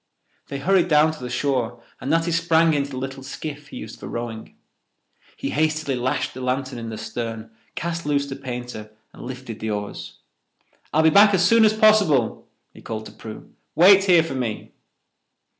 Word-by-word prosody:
They 140 - -5
hurried 180 +4 +2
down 155 -1 +4
to 155 - -10
the 125 - -6
shore 125 -2 -1 0.2
and - - -5
Natty 165 +2 +2
sprang 165 -1 +3
into 140 -1 0
the 130 - -7
little 135 +1 -5
skiff 145 +1 -7
he - - -9
used 110 - -9
for - - -8
rowing. 115 -1 -6 0.8
He - - -3
hastily 155 -2 0
lashed 130 +3 -1
the 130 - -8
lantern 130 0 -2
in 115 -1 -6
the 110 - -6
stern, 115 0 -5 0.2
cast 170 0 -3
loose 140 -1 +1
the 135 -1 -6
painter, 120 -4 -7 0.2
and - - -13
lifted 125 -3 -7
the 110 - -3
oars. 105 -1 -5 0.7
"I'll 155 - +3
be 160 - +5
back 205 +3 +7
as 180 -1 +3
soon 230 +1 +5
as 215 - +4
possible," 210 - +3 0.3
he - - -14
called 110 -1 -6
to - - -10
Prue. 110 -1 -11 0.2
"Wait 195 +3 +7
here 175 -4 +5
for 165 - -5
me." 120 -5 -4
140 Hz, 185 wpm, -23 LUFS, 120-165 Hz, 0.8 s, back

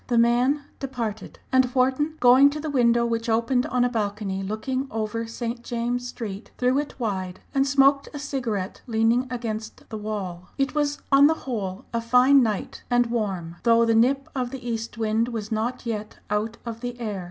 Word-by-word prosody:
The 240 - +1
man 245 +5 +3 0.2
departed, 235 -6 -4
and 260 0 +5
Wharton, 265 +5 +2
going 255 +3 +7
to 300 +1 -5
the 305 0 -3
window 235 -3 +3
which 230 0 -1
opened 235 +3 +2
on 245 -1 +2
a - - +2
balcony 205 -4 -2
looking 255 +7 -3
over 225 +1 -3
St. 235 +1 -5
James 245 +1 -2
Street, 215 -4 -6
threw 255 +2 +2
it 290 -2 -5
wide, 190 -5 -3
and 275 0 +2
smoked 275 0 +4
a - - -7
cigarette 240 -9 -3
leaning 230 +2 +2
against 220 -3 -5
the 220 - -5
wall. 190 -4 -5
It 275 -1 0
was 290 -1 0
on 275 +1 +7
the 320 - +2
whole 200 -7 -4
a 230 - 0
fine 250 +4 +5
night 215 -5 -2
and 245 -1 +2
warm, 190 -7 -2
though 230 0 +4
the 230 - +3
nip 265 +5 +3
of 255 -2 -2
the 255 -1 -7
east 230 0 -4
wind 220 +1 +1
was 225 -3 -5
not 230 +4 -2
yet 215 -2 -4
out 215 +2 -1
of 230 -1 -6
the 245 0 -5
air. 210 -4 -3
235 Hz, 185 wpm, -25 LUFS, 220-260 Hz, 0.2 s, going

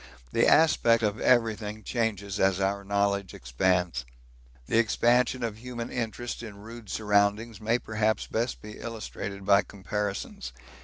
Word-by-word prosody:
The - - +3
aspect 120 -8 +5
of 105 0 0
everything 110 -3 +1
changes 105 -4 -2
as 95 0 +3
our 100 +1 0
knowledge 100 -1 0
expands. 85 +3 0 0.6
The 115 - +2
expansion 120 +2 +2
of 110 -2 -3
human 120 -1 -6
interest 120 0 -4
in 110 -4 -9
rude 110 +1 -11
surroundings 105 +1 +1
may 115 +2 +2
perhaps 110 -2 0
best 115 +2 -2
be 105 0 -9
illustrated 105 -3 -6
by 100 -1 +6
comparisons. 100 -9 -4
105 Hz, 135 wpm, -28 LUFS, 100-115 Hz, 0.6 s, by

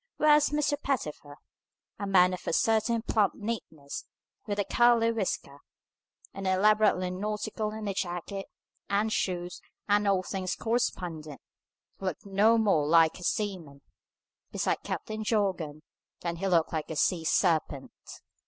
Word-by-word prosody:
Whereas 300 -1 +5
Mr. 295 -1 0
Pettifer 150 - -3 0.6
a 200 - -3
man 180 -1 +5
of 180 - -7
a - - 0
certain 225 +3 +2
plump 215 -4 +1
neatness, 185 -10 -6 0.4
with 205 -1 -2
a 205 - 0
curly 235 +2 +4
whisker, 185 -10 -3 0.7
and 195 -1 -5
elaborately 190 -1 +3
nautical 210 +2 -3
in 215 0 -6
a 200 - -1
jacket, 185 +2 -4 0.4
and 210 +2 +1
shoes, 180 -1 -2 0.3
and 205 0 +3
all 195 -2 +2
things 185 0 -3
correspondent 175 - -2 0.6
looked 185 -2 -4
no 205 +4 +4
more 195 -10 +2
like 165 +2 +4
a - - -10
seaman, 175 -9 -3 0.7
beside - - -1
Captain 215 0 -4
Jorgan, 185 -9 -1 0.4
than 170 -1 -3
he 195 +3 -2
looked 170 -4 +2
like 155 -1 -3
a 160 - -4
sea 165 +2 +1
serpent. 155 -5 +1
195 Hz, 135 wpm, -29 LUFS, 170-215 Hz, 0.7 s, Whereas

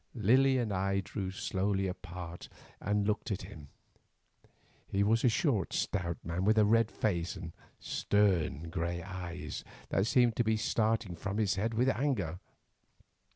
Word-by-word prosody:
Lily 130 +5 +4
and 115 -5 0
I 95 +1 +1
drew 95 0 -4
slowly 95 +1 -1
apart 90 -2 -6 0.3
and 105 0 0
looked 105 +3 -1
at 100 -3 -2
him. 80 -7 -10 1.2
He 100 +1 +1
was 110 +3 +2
a 125 - +6
short 115 - +1
stout 85 -4 -1
man, 85 +3 -2
with 110 +3 +3
a 105 - +6
red 115 +1 +4
face 85 -8 -1
and 85 -3 -7 0.3
stern 85 -6 +1
grey 85 0 -2
eyes, 90 -3 -6 0.3
that 95 +3 +1
seemed 120 -2 +4
to 120 - +3
be 110 -1 +2
starting 110 -3 0
from 100 +4 -4
his 105 -3 +2
head 110 +4 -1
with 125 +3 +2
anger. 115 - 0
100 Hz, 155 wpm, -32 LUFS, 90-110 Hz, 1.2 s, a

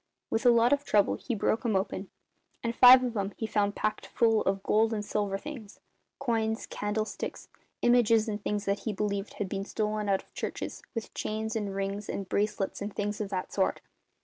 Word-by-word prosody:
With 225 +3 +2
a - - +9
lot 235 +2 +5
of 285 0 +1
trouble 205 -7 +3
he 240 - -3
broke 220 +2 0
'em 225 -4 +1
open, 190 0 -2 0.5
and 230 0 -1
five 255 +1 +9
of 245 -2 -2
'em 200 -1 -2
he 225 - -2
found 205 -2 0
packed 215 - -2
full 225 -2 +3
of 195 0 0
gold 220 +1 +3
and 210 -1 -3
silver 205 -2 -1
things 240 -5 -9 0.4
coins, 225 -4 -1
candlesticks, 215 +1 -4 0.3
images 230 -2 +4
and 210 -1 -4
things 205 0 -1
that 200 0 0
he 220 - -3
believed 200 0 -2
had 205 - -2
been 195 +1 -3
stolen 210 0 -2
out 195 -1 +1
of - - -32
churches, - - -5
with 230 - -5
chains 220 +1 -3
and 205 -3 -2
rings 195 +1 -3
and 195 - -3
bracelets 205 0 -1
and 205 0 -5
things 205 +1 -2
of 205 - -3
that 185 -2 -4
sort. 190 - +1
210 Hz, 200 wpm, -29 LUFS, 200-225 Hz, 0.5 s, a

